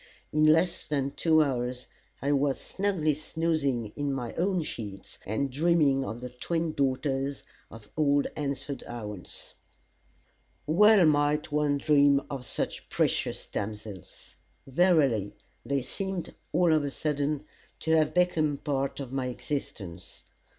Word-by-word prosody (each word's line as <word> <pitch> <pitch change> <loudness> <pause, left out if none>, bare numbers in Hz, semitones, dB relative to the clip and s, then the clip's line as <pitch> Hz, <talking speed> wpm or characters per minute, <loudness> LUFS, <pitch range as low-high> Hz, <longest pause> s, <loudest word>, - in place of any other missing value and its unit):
In 155 0 +4
less 165 +3 +3
than 140 -2 0
two 155 +2 +4
hours, 125 -2 -2 0.4
I 140 - +1
was 140 -1 +2
snugly 190 -6 0
snoozing 145 -7 -1
in 145 -1 -1
my 125 -4 -3
own 180 -1 0
sheets, 100 -8 -7
and 125 +7 -1
dreaming 150 -2 +3
of 120 -2 -5
the 125 - -5
twin 165 +5 -2
daughters 135 0 -1 0.3
of 115 -2 -12
old 145 -2 +3
Hansford 140 -1 -3
Owens. 105 -6 -8 1.1
Well 200 +5 +6
might 150 0 +2
one 145 -1 +2
dream 140 -1 +4
of 135 -3 -5
such - - -3
precious - - 0
damsels. 105 -3 -7 0.3
Verily, 135 - +3 0.3
they 140 -2 -1
seemed, 190 +5 -4 0.2
all 175 -3 +4
of 155 -2 +3
a 145 - -1
sudden, 150 0 -1 0.4
to 160 - -1
have 155 0 +2
become 165 -4 +3
a - - -8
part 140 -2 -2
of 135 -2 -6
my 130 -2 -1
existence. 120 - -6
145 Hz, 135 wpm, -28 LUFS, 130-155 Hz, 1.1 s, Well